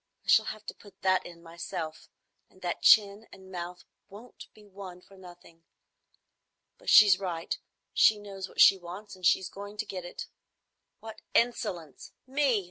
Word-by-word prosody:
I - - -9
shall - - +6
have 215 0 -7
to - - -6
put 200 -2 -19
that 185 -1 +2
in 170 -1 -14
myself; 165 -1 -7 0.4
and 185 - -22
that 175 - -3
chin 210 0 +5
and 190 0 -14
mouth 180 0 -7 0.2
won't 215 +5 -13
be 215 - -19
won 190 -3 -10
for 195 +2 -20
nothing. 175 -3 -16 1.2
But - - -6
she's 200 -4 +7
right. 175 -4 -3 0.4
She 215 - +5
knows 195 -2 -8
what - - -12
she 195 - +7
wants, 185 +4 -10
and 185 - -19
she's 185 +1 +3
going 205 +2 -10
to 215 - -3
get 185 -3 -6
it. 175 - -7 0.8
What 220 0 -10
insolence! 210 - -1
Me! 275 +3 -1
190 Hz, 165 wpm, -29 LUFS, 175-205 Hz, 1.2 s, she's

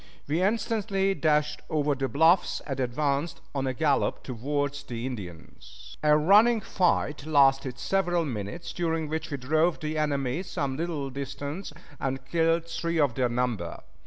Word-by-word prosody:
We 155 +5 0
instantly 200 -1 +1
dashed 150 -3 +1
over 150 -1 +1
the 135 -1 -1
bluffs, 165 +6 +3
and 135 -3 -4
advanced 140 +5 -1
on 135 -1 -1
a 130 - 0
gallop 150 -1 +1
toward 140 +3 -2
the 120 0 -4
Indians. 95 -10 -9
A 150 0 +5
running 210 +9 +5
fight 155 -7 0
lasted 135 -3 +3
several 175 +2 +1
minutes, 120 - -5
during 165 -2 -1
which 160 +1 -3
we 140 - -3
drove 155 +6 +1
the 155 0 -2
enemy 140 0 0
some 145 -8 -3
little 150 -3 -3
distance 140 +6 -5 0.3
and 135 -1 -3
killed 165 +3 +1
three 170 0 -2
of 145 -5 +3
their 125 0 +1
number. 120 -8 -2
150 Hz, 150 wpm, -27 LUFS, 135-165 Hz, 0.3 s, A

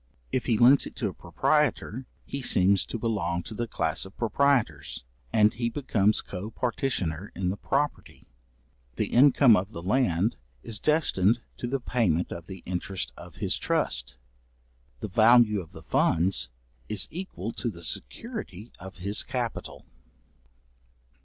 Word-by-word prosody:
If 130 - -1
he 115 -3 +3
lends 125 +4 +6
it - - -12
to - - -1
a - - -8
proprietor, 135 - 0 0.2
he 140 - -4
seems 95 -5 +3
to - - -3
belong 95 -6 -1
to 110 - -8
the 120 +2 -3
class 80 -6 -1
of 95 +1 -10
proprietors, 110 - +1 0.3
and 105 -1 +4
he 115 +1 -1
becomes 110 -5 +1
co 100 +3 -6
partitioner 105 - -2
in 90 0 -1
the 95 - -1
property; 145 +7 -2 0.7
the - - -1
income 130 -2 +6
of 95 +3 -2
the 85 - -6
land 100 -2 +1 0.3
is 110 -2 -4
destined 120 - +2 0.2
to 120 - -4
the 135 +2 -1
payment 100 -10 0
of 85 0 -7
the 95 -2 -9
interest 90 +1 -3
of 85 -3 -12
his - - -1
trust; - - -1 0.8
the - - -3
value 110 0 +5
of 80 - -13
the - - -12
funds 85 -7 +1 0.4
is 105 -3 +1
equal 185 +4 -5
to - - -2
the - - -8
security 205 - -5
of 95 0 -10
his 100 +3 -1
capital. 120 -3 -4
105 Hz, 150 wpm, -27 LUFS, 90-125 Hz, 0.8 s, lends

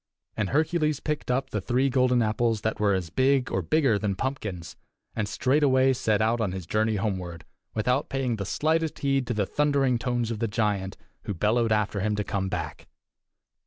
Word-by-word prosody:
And 105 -3 -1
Hercules 155 0 +1
picked 150 -3 -3
up 130 +1 0
the 105 - -2
three 125 +7 +1
golden 125 -2 +3
apples 110 0 0
that 110 - -2
were 100 -2 +3
as 90 -4 -3
big 130 +2 +2
or - - 0
bigger 135 -9 +2
than 100 -2 -1
pumpkins, 100 - -4 0.4
and 105 -2 -2
straightway 130 +1 +3
set 110 -5 +1
out 115 +1 +1
on 100 -4 -1
his 95 -3 -5
journey 110 +4 +1
homeward, 95 -6 -3 0.3
without 125 +6 0
paying 130 -4 -1
the 100 - -3
slightest 160 +4 0
heed 135 -2 0
to 120 - -1
the 105 -2 +1
thundering 140 -2 +1
tones 120 -2 -1
of 110 - -4
the 115 - 0
giant, 105 -3 -1 0.3
who 100 - -3
bellowed 110 +5 +1
after 105 -1 +1
him 105 +2 0
to 105 - -1
come 95 -2 -2
back. - - -5
115 Hz, 190 wpm, -26 LUFS, 105-135 Hz, 0.4 s, golden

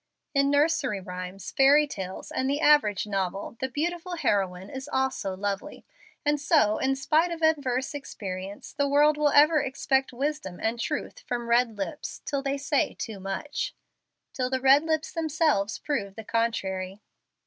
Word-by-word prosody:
In 275 -1 +3
nursery 285 -6 +2
rhymes, 185 0 -7
fairy 285 +3 +5
tales, 190 -9 -7
and 260 - -1
the 285 +1 0
average 290 -11 +4
novel, 195 0 -3
the 265 - -2
beautiful 345 +6 -3
heroine 190 - 0
is 265 +2 -7
also 260 -8 -1
lovely, 205 +8 -4 0.4
and 295 0 +2
so 290 -9 +3
in 270 +1 +1
spite 310 +5 +2
of 335 -1 -5
adverse 280 -4 +1
experience 195 -8 -7
the 285 0 +1
world 295 +2 +4
will 300 0 +2
ever 300 +2 +5
expect 265 0 0
wisdom 265 -8 -3
and 225 +1 -1
truth - - -3
from 240 - -4
red 235 -2 +2
lips, 300 +10 -5
till 280 -2 -1
they 275 0 -1
say 280 0 0
too 220 -4 -6
much 290 - -4 0.6
till 255 -1 -1
the 260 0 0
red 270 +2 +6
lips 315 0 -1
themselves 310 - +1
prove 200 -10 -3
the 220 - -7
contrary. 195 -4 -2
265 Hz, 160 wpm, -27 LUFS, 205-295 Hz, 0.6 s, red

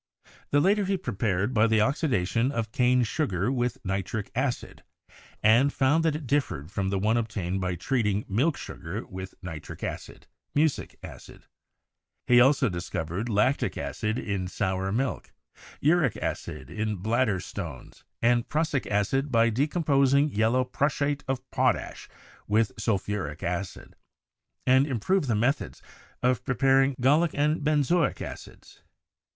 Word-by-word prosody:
The 145 - +3
latter 200 +6 +3
he 195 0 0
prepared 105 - -1
by 110 -1 +4
the 110 -1 +3
oxidation 125 - +1
of 115 -5 -3
cane 125 0 +3
sugar 110 - -1
with 125 -1 -1
nitric 95 +2 -3
acid, 130 0 -3 0.6
and 120 +6 +5
found 145 +5 +2
that 160 -2 +1
it 155 -1 -5
differed 115 - -1
from 95 -1 -1
the 100 - 0
one 110 +4 +2
obtained 95 -5 -2
by 90 -1 -1
treating 105 - 0
milk 135 +10 +1
sugar 95 +8 -6
with 95 0 -8
nitric 80 -4 -8
acid - - -6 0.3
(mucic 150 0 +1
acid). - - -12 0.8
He 120 0 +6
also 135 +1 +4
discovered 85 +3 -3
lactic 110 +6 +1
acid 110 +2 -2
in 100 -5 -2
sour 95 0 -2
milk, 130 +5 -2 0.5
uric 150 - +3
acid 75 -4 -5
in 110 +3 -2
bladder 110 +1 0
stones, 85 -8 -8 0.2
and 120 0 +2
prussic 155 -2 0
acid 135 +8 0
by 115 0 +4
de 135 +7 +1
composing 140 -3 +3
yellow 115 +2 +2
prussiate 140 +2 -1
of 130 -1 -3
potash - - 0 0.4
with 110 +1 +2
sulphuric 100 -7 -2
acid; 90 +2 -4 0.7
and 130 +2 +4
improved 145 - 0
the 115 - +1
methods 125 +7 0 0.4
of 125 -1 +2
preparing 135 0 +3
gallic 150 +6 +3
and 150 +1 +1
ben 150 -1 +3
zoic 170 +1 +1
acids. - - -10
120 Hz, 140 wpm, -27 LUFS, 100-140 Hz, 0.8 s, He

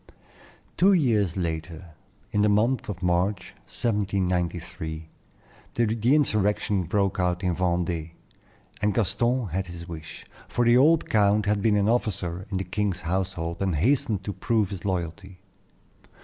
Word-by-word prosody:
Two 195 +3 +5
years 110 - +2
later, 85 0 -4 0.4
in 105 - +1
the 105 - +4
month 110 +5 +1
of 95 -2 -5
March, 90 +2 0
1793, 90 -6 -2 0.7
the 115 +3 +2
insurrection 105 - +1
broke 100 +2 0
out 90 +1 0
in 90 -2 +1
Vendée, 85 -2 -1 0.7
and 105 0 +1
Gaston 115 +2 +1
had 95 +2 -2
his 85 0 -9
wish; 80 -2 -9 0.2
for 120 - 0
the 120 +1 +5
old 155 +5 +4
count 105 0 +3
had 105 -1 +1
been 105 0 +3
an 100 0 +2
officer 95 -6 -1
of 100 - -2
the 95 - -1
king's 95 0 -2
household, 85 -1 -3
and 95 -4 0
hastened 105 - +1
to 100 - -4
prove 105 +2 0
his 95 -1 -7
loyalty. 95 +1 -3
95 Hz, 140 wpm, -26 LUFS, 90-105 Hz, 0.7 s, Two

